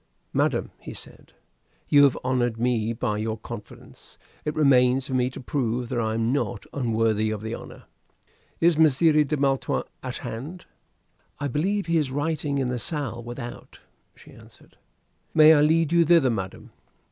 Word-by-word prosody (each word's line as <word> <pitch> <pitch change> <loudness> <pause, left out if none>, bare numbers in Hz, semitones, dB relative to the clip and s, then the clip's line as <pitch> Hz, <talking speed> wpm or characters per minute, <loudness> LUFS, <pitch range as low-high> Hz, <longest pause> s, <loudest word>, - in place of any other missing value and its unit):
"Madam," - - 0
he - - -9
said, - - -13 0.5
"you 145 -1 +6
have 135 - +2
honored 125 -3 0
me 115 -2 0
by 105 -2 -2
your 110 0 -2
confidence. 110 -1 -11 0.3
It 150 - -2
remains 130 -3 +4
for 135 - -5
me 125 -1 +1
to 130 - -9
prove 125 -3 -2
that 125 - -1
I 110 -1 -1
am 115 +2 0
not 145 - -2
unworthy 110 -4 0
of 110 -1 -4
the 110 +1 -4
honor. - - -9 0.8
Is 165 -2 +3
Messire 155 0 +4
de 150 +1 -2
Maletroit 135 -1 0 0.2
at - - -5
hand?" 150 +11 -7 0.7
"I 145 - -2
believe 185 +9 -1
he 170 -1 +2
is 145 -4 -1
writing 145 0 -2
in 130 -2 0
the 125 -1 -2
salle 125 -4 -3
without," 120 +1 -9 0.4
she - - -17
answered. - - -18 0.6
"May 155 0 +8
I 145 - +4
lead 160 +1 +3
you 170 0 +5
thither, 160 -6 +4
madam?" 95 -4 -6
130 Hz, 165 wpm, -25 LUFS, 115-150 Hz, 0.8 s, May